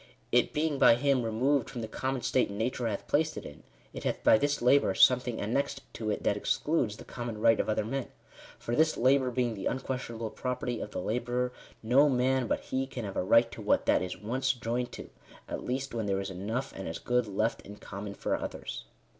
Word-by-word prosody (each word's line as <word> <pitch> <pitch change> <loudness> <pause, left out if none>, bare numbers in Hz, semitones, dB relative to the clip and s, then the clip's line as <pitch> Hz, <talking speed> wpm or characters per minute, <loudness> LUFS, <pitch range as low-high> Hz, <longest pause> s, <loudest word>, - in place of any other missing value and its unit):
It 120 0 +3
being 150 -2 0
by - - +7
him 135 +1 +2
removed 120 +4 +1
from 120 - -6
the 110 - -4
common 130 +3 -3
state 130 - +2
nature 115 +4 -2
hath 105 -3 -4
placed 155 +1 +1
it - - -6
in, - - -10 0.3
it - - -7
hath - - -2
by 110 - +6
this 145 +2 +1
labour 125 -5 +4
something 125 0 +4
annexed 135 +5 -1
to 110 -2 -4
it 105 - -2
that 100 - +2
excludes 110 0 0
the - - -11
common 120 -3 -5
right 115 0 +4
of - - 0
other 110 -1 0
men. 135 +3 -3 0.5
For 120 - -3
this 155 +2 +3
labour 130 +1 +3
being 125 -1 0
the 100 -3 -3
unquestionable 125 -4 -3
property 125 -1 -3
of - - -5
the 105 - -4
labourer, 125 +3 -1 0.3
no 135 +6 +5
man 130 -1 +2
but - - 0
he 130 0 -2
can 120 -4 -6
have 100 - -6
a - - +1
right 115 +5 +4
to - - -8
what 105 - +2
that - - +3
is 90 0 -4
once 130 +5 0
joined 120 0 -3
to, - - -9 0.4
at - - -5
least 130 +1 -3
when 110 -3 -2
there 95 -1 +1
is 95 0 -4
enough 110 +9 -3
and 95 - -6
as 80 0 -4
good 125 -2 0
left 105 +3 -1
in 105 - -11
common 100 0 -7
for - - -1
others." - - -6
120 Hz, 220 wpm, -30 LUFS, 110-130 Hz, 0.5 s, by